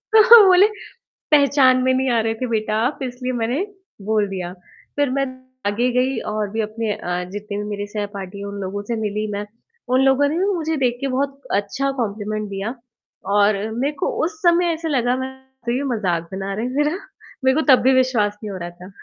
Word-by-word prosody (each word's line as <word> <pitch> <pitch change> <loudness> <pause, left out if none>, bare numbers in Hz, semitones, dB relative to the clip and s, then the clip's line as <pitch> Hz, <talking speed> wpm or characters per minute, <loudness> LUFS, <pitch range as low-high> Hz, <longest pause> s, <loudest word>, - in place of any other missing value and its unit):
तो 440 - +10 0.2
वो 410 - +8
बोले, 375 +2 +7 0.7
"पहचान 275 -3 +5
में 260 0 +3
नहीं 260 0 +1
आ - - +3
रहे 225 0 0
थे - - +1
बेटा 215 -1 -1
आप, 275 - -2
इसलिए 250 0 -4
मैंने 265 - 0 0.4
बोल 210 -2 +2
दिया।" 180 -2 -5 0.4
फ़िर 285 -2 +1
मैं 275 +1 0 0.4
आगे 220 +5 +1
गई 250 0 +1
और 215 -1 -2
भी 220 +2 -2
अपने 215 0 -2
अ, 180 0 -3
जितने 205 0 -5
भी 210 - -3
मेरे 205 0 -3
सहपाठी 205 -2 -6
हैं 200 - -5
उन 200 0 -6
लोगों 200 +2 -4
से 235 - 0
मिली 210 0 -2
मैं, 205 +1 -4 0.4
उन 255 +1 +3
लोगों 270 +2 +4
ने 315 - -1
भी 370 - +2
मुझे 320 -2 -1
देख 240 -1 +1
के 275 - -1
बहुत 275 +1 -2 0.2
अच्छा 275 +7 -2
कॉम्पलिमेंट 215 -1 -3
दिया 200 +5 -4 0.6
और 205 0 +4 0.2
मेरे 265 +6 -1
को - - +1 0.2
उस 320 -1 -4
समय 345 0 +4
ऐसे 325 0 -4
लगा 250 -4 +1
मैं 260 0 -3 0.4
तो 235 - +1
ये 260 +3 -1
मज़ाक 175 -6 -1
बना 195 +1 -4
रहे 220 +4 -2
हैं 250 - -4
मेरा, 295 +1 +2 0.5
मेरे 260 0 +4
को - - 0
तब 255 - +6
भी 260 - +5
विश्वास 245 -6 +2
नहीं 210 - -5
हो 190 - -5
रहा 175 0 -5
था। 180 +1 -13
235 Hz, 215 wpm, -21 LUFS, 205-270 Hz, 0.7 s, तो